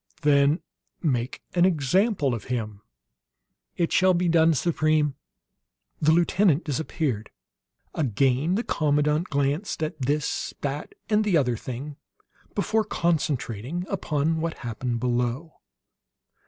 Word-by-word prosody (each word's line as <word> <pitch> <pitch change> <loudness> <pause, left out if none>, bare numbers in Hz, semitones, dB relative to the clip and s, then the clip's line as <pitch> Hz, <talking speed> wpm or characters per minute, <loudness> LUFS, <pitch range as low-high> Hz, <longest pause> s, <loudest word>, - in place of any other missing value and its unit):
Then 145 +2 +4 0.4
make 125 -5 -1
an 175 - +3
example 180 - +2
of 115 -3 -5
him!" 110 -5 -4 1.0
"It 170 -2 0
shall 185 -1 +4
be 175 +1 +1
done, 165 -1 +4
Supreme!" 155 -2 +1 0.9
The 155 +1 +4
lieutenant 175 0 +3
disappeared. 145 -6 -2 0.6
Again 135 - +1
the 225 - 0
commandant 150 +1 +1
glanced 145 +5 -1
at 155 -1 -4
this, 145 +3 -1
that, 145 +1 -4
and 215 0 +3
the 200 -5 +3
other 125 -5 +1
thing 130 +6 -7 0.6
before 215 +2 +1
concentrating 155 - -1
upon 160 -4 0
what 165 0 -2
happened 120 +1 -2
below. 125 +6 -2
150 Hz, 115 wpm, -25 LUFS, 130-170 Hz, 1.0 s, Then